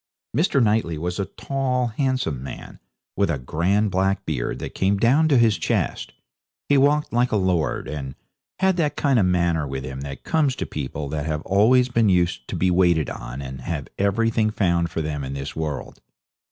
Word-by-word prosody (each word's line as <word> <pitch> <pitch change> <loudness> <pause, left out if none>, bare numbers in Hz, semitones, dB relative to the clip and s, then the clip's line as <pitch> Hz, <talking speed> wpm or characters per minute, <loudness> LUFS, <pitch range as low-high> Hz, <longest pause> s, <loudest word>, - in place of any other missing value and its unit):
Mr. 145 -5 +3
Knightley 105 -7 +1
was 90 +4 -3
a 100 - 0
tall, 130 +1 -2
handsome 130 - -1
man, 65 - -9 0.4
with 100 -1 +1
a 80 - 0
grand 95 +11 0
black 95 +1 0
beard 70 -6 -2
that - - -6
came 100 +1 +1
down 130 +9 +4
to 145 -4 +4
his 115 -3 +3
chest. - - -1 0.6
He 145 - +3
walked 145 +1 +3
like 120 +1 +2
a - - +1
lord, 90 -6 0
and 70 -3 -5 0.4
had 190 -1 +2
that 150 -4 0
kind 135 -4 +2
of 95 - +3
manner 85 -4 +1
with 65 -1 -4
him 65 +1 -6
that 70 -1 -7
comes 150 -5 +1
to - - -3
people 70 0 -5
that 75 +1 -3
have 75 0 -2
always 115 +7 +4
been 115 -4 +2
used 85 -9 +1
to - - -4
be 90 0 +2
waited 85 -3 +3
on 60 +3 -7
and 65 0 -7
have 80 -5 -4
everything 110 +2 +2
found 85 -5 +1
for 80 -1 -3
them 75 -2 -3
in 65 +1 -5
this 70 0 -5
world. 75 -3 -5
95 Hz, 195 wpm, -23 LUFS, 75-120 Hz, 0.6 s, down